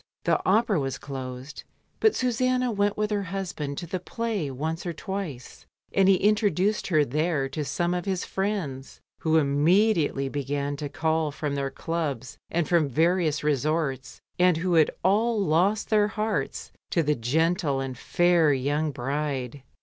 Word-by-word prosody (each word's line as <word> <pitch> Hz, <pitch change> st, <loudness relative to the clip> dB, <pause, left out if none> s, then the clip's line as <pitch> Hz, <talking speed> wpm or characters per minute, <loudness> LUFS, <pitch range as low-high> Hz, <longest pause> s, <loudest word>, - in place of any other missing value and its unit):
The -, -, +2 dB
Opera 210 Hz, -1 st, +3 dB
was 135 Hz, -2 st, -2 dB
closed^ 130 Hz, 0 st, -7 dB, 0.4 s
but 440 Hz, -, +4 dB
Susanna 255 Hz, 0 st, +1 dB
went 205 Hz, -1 st, 0 dB
with 210 Hz, 0 st, -1 dB
her 205 Hz, -1 st, +1 dB
husband 180 Hz, -7 st, -4 dB
to 175 Hz, -, -4 dB
the 180 Hz, +2 st, -3 dB
play 210 Hz, -4 st, -3 dB
once 155 Hz, +5 st, -3 dB
or 175 Hz, -, -3 dB
twice, 170 Hz, -7 st, -6 dB, 0.3 s
and 195 Hz, 0 st, +4 dB
he 195 Hz, -, +7 dB
introduced 205 Hz, 0 st, +1 dB
her 155 Hz, -5 st, +3 dB
th^re 150 Hz, 0 st, -1 dB
to 150 Hz, +2 st, -3 dB
some 175 Hz, +4 st, -1 dB
of 180 Hz, +1 st, -2 dB
his 190 Hz, -3 st, -1 dB
friends, 190 Hz, -10 st, -3 dB, 0.2 s
who 160 Hz, 0 st, +2 dB
immediately 155 Hz, +1 st, +2 dB
began 140 Hz, +1 st, -2 dB
to 145 Hz, 0 st, -4 dB
call 160 Hz, 0 st, 0 dB
from 145 Hz, 0 st, -3 dB
their 140 Hz, -1 st, -1 dB
clubs 140 Hz, -4 st, -4 dB
and 170 Hz, -1 st, 0 dB
from 165 Hz, -5 st, +2 dB
various 160 Hz, +1 st, +1 dB
resorts, 150 Hz, -1 st, -1 dB, 0.2 s
and 180 Hz, -2 st, +4 dB
who 170 Hz, -1 st, +4 dB, 0.2 s
all 215 Hz, +5 st, +2 dB
lost 195 Hz, +5 st, +1 dB
their 210 Hz, -1 st, +4 dB
hearts 215 Hz, +1 st, -3 dB, 0.2 s
to 165 Hz, -, +1 dB
the 150 Hz, 0 st, +2 dB
gentle 150 Hz, +3 st, +1 dB
and 135 Hz, -1 st, -4 dB
fair 175 Hz, +3 st, +3 dB
young 145 Hz, +3 st, 0 dB
bride. 140 Hz, -1 st, -3 dB
160 Hz, 155 wpm, -26 LUFS, 140-195 Hz, 0.4 s, he